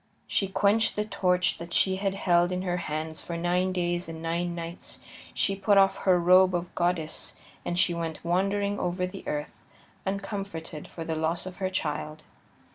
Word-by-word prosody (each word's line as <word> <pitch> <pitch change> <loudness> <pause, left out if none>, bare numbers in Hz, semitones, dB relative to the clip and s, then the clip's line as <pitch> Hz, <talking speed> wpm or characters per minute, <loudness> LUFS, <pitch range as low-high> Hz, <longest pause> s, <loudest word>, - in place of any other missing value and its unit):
She 195 - +1
quenched 205 +3 +3
the 210 - 0
torch 180 -3 +1
that 170 0 -7
she 190 +1 +3
had 195 0 -1
held 175 -2 +3
in 180 0 -1
her 180 -1 0
hands 155 -1 -3
for 170 - -5
nine 180 +2 +1
days 175 -1 -1
and 160 0 -6
nine 170 +1 -1
nights; 170 0 -6 0.3
she 195 - +1
put 200 +1 +3
off 195 0 +5
her 185 -2 +3
robe 185 +1 +6
of 175 0 -3
goddess, 175 -3 -1 0.3
and 175 - -2
she 175 -1 +4
went 165 -1 -4
wandering 200 +3 +1
over 180 +1 0
the 185 +2 -8
earth, 150 0 -3 0.5
uncomforted 195 -5 -4
for 165 - -7
the 160 - -2
loss 160 +3 -1
of 185 -1 -7
her 190 -1 -1
child. 155 -3 -3
180 Hz, 180 wpm, -28 LUFS, 170-190 Hz, 0.5 s, robe